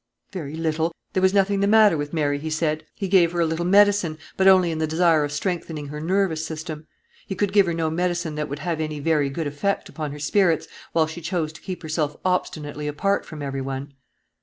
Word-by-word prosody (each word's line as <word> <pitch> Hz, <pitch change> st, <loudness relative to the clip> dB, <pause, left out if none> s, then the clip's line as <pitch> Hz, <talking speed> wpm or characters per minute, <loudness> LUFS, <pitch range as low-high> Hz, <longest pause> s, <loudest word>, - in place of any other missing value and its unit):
"Very 155 Hz, -6 st, -5 dB
little; 160 Hz, 0 st, 0 dB, 0.2 s
there 185 Hz, -, +1 dB
was 190 Hz, 0 st, +4 dB
nothing 200 Hz, 0 st, +2 dB
the 200 Hz, -, +2 dB
matter 215 Hz, -3 st, +6 dB
with 145 Hz, -1 st, -3 dB
Mary, 145 Hz, -3 st, 0 dB
he 160 Hz, +2 st, -4 dB
said. 155 Hz, -1 st, -1 dB
He 195 Hz, -, -3 dB
gave 175 Hz, -3 st, +4 dB
her 175 Hz, -, -1 dB
a 170 Hz, -, +4 dB
little 160 Hz, +2 st, -1 dB
medicine, 200 Hz, -4 st, +4 dB, 0.2 s
but 190 Hz, -, +3 dB
only 185 Hz, -3 st, +6 dB
in 160 Hz, -, -3 dB
the 160 Hz, -, 0 dB
desire 160 Hz, -1 st, +3 dB
of 145 Hz, -, -3 dB
strengthening 155 Hz, -2 st, -3 dB
her 150 Hz, +1 st, -6 dB
nervous 175 Hz, -2 st, +1 dB
system. 160 Hz, -1 st, -6 dB, 0.4 s
He 195 Hz, -, -3 dB
could 200 Hz, +1 st, -1 dB
give 200 Hz, -3 st, +5 dB
her 170 Hz, -, 0 dB
no 160 Hz, -1 st, 0 dB
medicine 175 Hz, -1 st, -1 dB
that 150 Hz, 0 st, -3 dB
would 140 Hz, -, -4 dB
have 165 Hz, 0 st, -2 dB
any 155 Hz, -1 st, -3 dB
very 150 Hz, -1 st, +1 dB
good 155 Hz, +4 st, -3 dB
effect 145 Hz, +8 st, -2 dB
upon 155 Hz, -3 st, -5 dB
her 145 Hz, -, -7 dB
spirits, 165 Hz, +2 st, +2 dB, 0.2 s
while 165 Hz, -1 st, +3 dB
she 160 Hz, +2 st, -8 dB
chose 165 Hz, -2 st, -2 dB
to 160 Hz, -, -13 dB
keep 185 Hz, -2 st, -6 dB
herself 155 Hz, -2 st, -2 dB
obstinately 150 Hz, -5 st, -2 dB
apart 195 Hz, +7 st, 0 dB
from 155 Hz, -2 st, -7 dB
every 135 Hz, -1 st, -3 dB
one." 135 Hz, +1 st, -5 dB
160 Hz, 225 wpm, -23 LUFS, 150-185 Hz, 0.4 s, matter